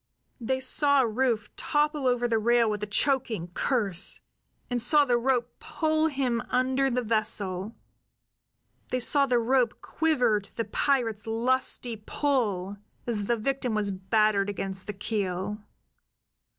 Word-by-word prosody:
They 260 +2 -1
saw 280 +2 +4
Rufe 230 -2 -1
topple 295 -2 0
over 245 -1 +1
the 225 -2 +1
rail 235 +1 +3
with 210 -1 -2
a 210 - -3
choking 220 - 0
curse, 200 -6 +1 0.5
and 245 -1 0
saw 290 +4 +4
the 245 -2 +2
rope 245 -1 0
pull 315 0 0
him 260 -6 -1
under 260 +2 +1
the 250 0 -1
vessel; 215 -2 -1 1.1
they 255 - -1
saw 280 +3 +3
the 250 -2 +2
rope 240 0 +1
quiver 250 -10 +1
to 200 - -18
the 230 - -1
pirates' 225 -3 0
lusty 240 0 -1
pull 210 -9 -1 0.3
as 210 -4 -2
the 235 - +1
victim 250 0 -2
was 205 -2 0
battered 200 +1 +1
against 190 -1 -5
the 210 - -4
keel. 200 -1 -3
235 Hz, 135 wpm, -27 LUFS, 210-260 Hz, 1.1 s, saw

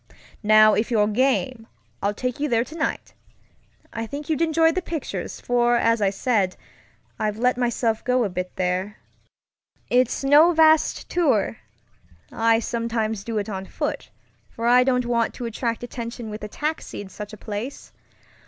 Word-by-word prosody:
"Now 215 0 +6
if 220 - 0
you're 215 -4 +3
game, 255 +1 0 0.3
I'll 205 +1 0
take 250 +3 -3
you 295 +1 -1
there 230 -1 +2
tonight. 315 +6 -4 0.8
I 225 0 -4
think 290 +5 -5
you'd 310 - 0
enjoy 325 0 +3
the 370 - -2
pictures, 330 -4 -5
for 240 0 +2
as 230 -1 +2
I 200 - +3
said, 195 -2 0 0.6
I've 210 -1 -1
let 250 +2 +2
myself 235 -2 0
go 250 -1 +2
a - - +1
bit 180 0 -5
there. 185 +3 -2 0.9
It's 250 +1 +2
no 300 +5 +6
vast 315 -1 +4
tourŌĆöI 195 - -1
sometimes 225 -3 -2
do 225 0 -4
it 205 - -2
on 190 -2 -5
foot, - - -4 0.4
for 230 - -6
I 250 +1 +6
don't 250 -1 +1
want 235 -1 0
to 245 - -5
attract 230 +1 -3
attention 235 -2 -6
with 210 - -7
a - - -3
taxi 305 +8 -4
in 205 - -9
such 210 +2 -8
a 215 - -10
place. 215 +7 -6
230 Hz, 160 wpm, -23 LUFS, 210-255 Hz, 0.9 s, Now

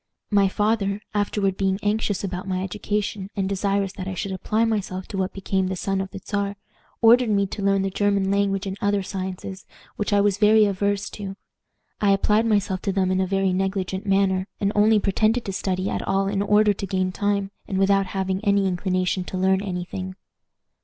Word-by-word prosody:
"My 200 -1 +4
father, 205 0 0
afterward 205 -2 0
being 190 -1 +1
anxious 205 -1 0
about 185 -1 -4
my 185 -1 -1
education, 205 0 -3
and 195 -2 0
desirous 200 0 0
that 190 -1 -6
I 190 - -4
should 195 - -3
apply 215 +4 0
myself 195 -4 -2
to 195 - -5
what 190 0 -1
became 190 -1 -1
the 190 - -2
son 195 +1 -1
of 190 - -5
the - - -8
Czar, 200 -1 -2 0.5
ordered 235 +1 +6
me 200 -1 +2
to 200 +2 -6
learn 195 0 +2
the 195 - -1
German 200 -1 +1
language 200 -1 +1
and 190 -1 -3
other 205 -1 +1
sciences, 190 0 -6 0.3
which 210 - -2
I 205 - +4
was 200 -1 +2
very 215 0 +6
averse 200 0 0
to. 195 -2 -6 0.7
I 200 -1 +4
applied 210 +3 +2
myself 200 -3 +1
to 195 - -1
them 190 -1 +1
in 185 0 +1
a 190 - 0
very 195 0 +1
negligent 190 +1 -2
manner, 195 -1 +2
and 200 0 +1
only 215 +1 +4
pretended 215 +4 +1
to 195 - -3
study 185 0 -1
at - - -2
all 195 0 0
in 200 0 0
order 210 +1 +4
to 195 0 -5
gain 185 0 0
time, 200 +1 -1 0.2
and 190 - -2
without 195 0 +3
having 190 0 -2
any 200 -2 +3
inclination 185 0 0
to 185 - -5
learn 190 +1 +2
any 180 -3 -3
thing. 185 0 -6
195 Hz, 200 wpm, -24 LUFS, 190-205 Hz, 0.7 s, ordered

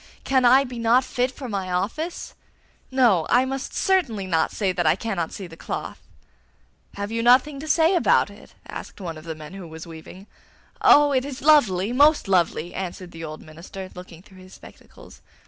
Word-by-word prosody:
Can 260 -2 +2
I 260 +3 +6
be 250 -3 -7
not 230 +3 +3
fit 250 0 -1
for 260 0 -9
my 195 -4 -4
office? 235 - -3 0.6
No, 235 -11 +3
I 250 +1 +4
must 270 +1 -5
certainly 275 - 0
not 165 -3 0
say 195 -3 -1
that 175 -3 -1
I 155 - +4
cannot 190 -5 -3
see 195 - -7
the 165 -2 -12
cloth!' - - -6 1.0
'Have 200 +1 -5
you 230 0 -1
nothing 255 +4 +4
to 310 - -8
say 320 +3 +3
about 355 - +3
it?' - - -17
asked - - -9
one 170 -4 -6
of 155 +1 -12
the 160 -1 -5
men 155 +2 -11
who 195 -3 -9
was 160 +1 -10
weaving. 170 +3 -12 0.6
'Oh, 290 0 +6
it 260 -2 +1
is 270 -2 -7
lovely, 235 -9 +4
most 290 -1 +4
lovely!' 175 -2 0
answered 185 -1 -6
the 165 0 -9
old 155 -1 -8
minister, 180 +4 -10
looking 180 -1 -12
through 190 -2 -18
his 185 0 -14
spectacles. - - -16
200 Hz, 190 wpm, -23 LUFS, 175-260 Hz, 1.0 s, I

